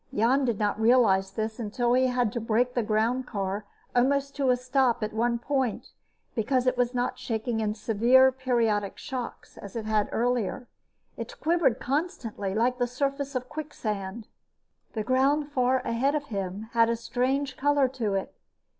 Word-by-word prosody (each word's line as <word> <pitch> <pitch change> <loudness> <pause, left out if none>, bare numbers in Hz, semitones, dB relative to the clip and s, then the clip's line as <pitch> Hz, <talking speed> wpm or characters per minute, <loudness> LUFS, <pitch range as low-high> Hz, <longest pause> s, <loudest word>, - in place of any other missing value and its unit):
Jan 255 +6 +2
did 235 -4 0
not 210 +1 -1
realize 220 -5 +4
this 220 +1 -4
until 240 +2 0
he 255 +1 +4
had 245 -4 0
to 235 - -2
brake 235 +3 +1
the 245 - +1
groundcar 215 -2 -1 0.3
almost 275 +3 +2
to 275 -2 +1
a 250 - +4
stop 250 -2 +1
at 215 - -3
one 235 +2 +1
point, 260 -1 -2 0.4
because 250 +3 +1
it 255 - +2
was 245 0 0
not 245 0 -1
shaking 225 0 -2
in 215 -1 -1
severe, 240 +5 +4
periodic 235 -6 0
shocks 255 -3 -7
as 200 +1 -10
it 225 -2 -3
had 215 -1 +1
earlier. 240 0 -1 0.5
It - - -7
quivered 325 -7 +2
constantly, 245 - -2
like 245 +3 +1
the 245 - +2
surface 275 +2 -2
of 255 0 -2
quicksand. 225 -9 -5 0.7
The 220 - -2
ground 275 +4 +2
far 255 -1 +2
ahead 260 +4 0
of 295 - -1
him 195 +2 -4
had 230 -1 +4
a 230 - +1
strange 260 +4 -1
color 285 0 +3
to 230 -6 -2
it. 195 - -3
245 Hz, 165 wpm, -27 LUFS, 220-260 Hz, 0.7 s, realize